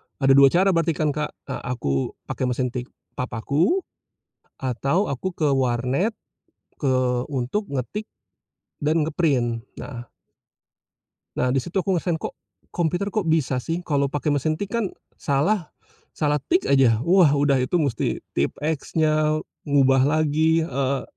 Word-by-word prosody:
ada 135 -1 +3
2 140 0 +8
cara 185 +7 +3
berarti 165 -2 +1
kan 150 -1 +1
Kak. 150 +1 -4
Eee, 135 - -5
aku 70 - -2
pakai 130 - -3
mesin 125 0 -1
tik 125 -1 -5 0.3
papaku, 140 - 0 0.8
atau 140 - 0
aku 175 +7 -3
ke 155 -4 +1
warnet, 130 - +1 0.6
ke 130 -3 +1
untuk 135 - -1
ngetik 140 - -3 0.8
dan 155 +1 +2
nge-print. 135 -8 0 0.2
Nah 120 -4 -8 1.3
nah, 125 - +2
di 135 - +3
situ 175 +8 -9
aku 190 0 +1
ngerasain, 170 -1 0
kok - - -5 0.4
komputer 175 +4 0
kok 215 -4 -1
bisa 155 -5 +1
sih 165 +6 -3
kalau 140 -2 +2
pakai 145 +1 -1
mesin 145 +2 +1
tik 200 +5 -5
kan 230 -3 0 0.3
salah 160 +6 0 0.4
salah 150 -1 +1
tik 355 - 0
aja, 130 -5 +5
wah 175 -5 +5
udah 140 -2 +3
itu 150 +8 +1
mesti 140 -8 0 0.2
tipe-eks-nya, 155 - 0 0.3
ngubah 135 -2 +4
lagi, 155 +2 +2
eee, 135 0 -1
145 Hz, 140 wpm, -23 LUFS, 130-165 Hz, 1.3 s, 2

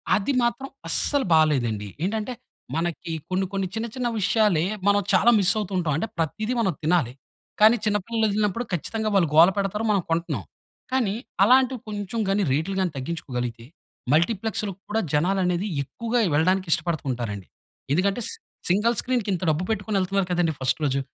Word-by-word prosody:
అది 210 +8 0
మాత్రం 240 +3 -1 0.2
అస్సలు 285 -2 +2
బాలేదండి. 120 -10 +2 0.2
ఏంటంటే, 220 +5 -2 0.4
మనకి 165 0 -3 0.2
కొన్ని, 190 +1 0
కొన్ని 195 -1 -1
చిన్న, 225 +1 -2
చిన్న 250 -1 -1
విషయాలే 205 -5 +2 0.2
మనం 205 0 +4
చాలా 240 - +5
మిస్ 195 0 +4
అవుతూ 200 -2 -4
ఉంటాం. 165 -5 0
అంటే 225 - -2
ప్రతీదీ 215 +9 -1
మనం 190 -6 +1
తినాలి. 155 -7 +2 0.5
కానీ, 220 +2 +8
చిన్న 210 0 +2
పిల్లలు 225 -1 +1
వదిలినప్పుడు 210 +2 0
ఖచ్చితంగా 215 +6 -1
వాళ్ళు 170 -6 +3
గోల 170 +3 +8
పెడతారు, 200 +3 -1
మనం 200 - +2
కొంటున్నాం. 165 +1 -1 0.5
కానీ, 235 -7 +1 0.3
అలాంటివి 255 +2 +4
కొంచెం 205 +2 -4
గాని 200 +1 +2
రేట్లు 160 +7 -1
గాని 185 -3 0
తగ్గించుకోగలిగితే, 125 -6 -4 0.5
మల్టీప్లెక్స్‌లో 200 +5 0 0.2
కూడా, 220 +1 +1
జనాలు 180 +6 +2
అనేది 180 +3 0 0.2
ఎక్కువగా 235 - -2
వెళ్ళడానికి 185 +4 +2
ఇష్టపడుతూ 160 -2 -2
ఉంటారండి. 105 -6 -5 0.5
ఎందుకంటే 195 +7 +1
సి - - -3 0.3
సింగిల్ 220 +6 +2
స్క్రీన్‌కి 245 -5 -1
ఇంత 180 - -3
డబ్బు 155 +4 -1
పెట్టుకొని 205 -1 -1
ఎళ్తున్నారు 195 0 0
కదండీ 175 -3 +1
ఫస్ట్ 130 +4 +1
రోజు, 135 0 +1
195 Hz, 160 wpm, -24 LUFS, 165-220 Hz, 0.5 s, కానీ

